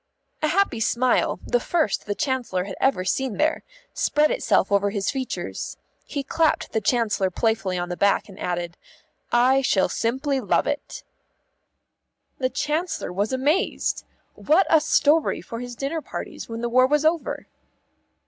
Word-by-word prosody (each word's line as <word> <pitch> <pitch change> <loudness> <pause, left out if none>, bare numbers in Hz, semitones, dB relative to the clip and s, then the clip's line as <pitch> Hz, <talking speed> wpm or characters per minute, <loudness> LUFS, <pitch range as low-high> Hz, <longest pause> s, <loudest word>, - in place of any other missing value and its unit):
A 310 - +2
happy 360 - +1
smile, 240 +3 +1
the - - +1
first 320 - 0
the 205 - -1
Chancellor 250 - -1
had 195 0 -6
ever 265 -9 +2
seen 260 +3 -1
there, 310 +1 +1 0.3
spread 300 +1 +2
itself - - +1
over 200 0 +3
his 200 -1 -1
features. 265 -2 -4 0.3
He 280 - -3
clapped 320 +3 +1
the 220 - 0
Chancellor 215 -6 +1
playfully 205 -2 0
on 175 0 -3
the 175 - -3
back 200 +2 +2
and 195 -2 -13
added, 175 -1 -3 0.5
"I 255 +3 +4
shall 195 -8 +2
simply 265 +7 -1
love 210 - +1
it." - - -4 1.4
The 255 -1 +1
Chancellor 310 - -2
was 200 +3 -1
amazed. 285 +8 0 0.3
What 335 +6 +3
a 320 -2 +6
story 300 +1 +3
for 230 - -7
his 245 0 -7
dinner 280 +6 -3
parties - - -7
when 230 0 -5
the 240 - -1
war 255 +2 +5
was 295 +2 +1
over! 325 0 0
255 Hz, 155 wpm, -24 LUFS, 205-300 Hz, 1.4 s, a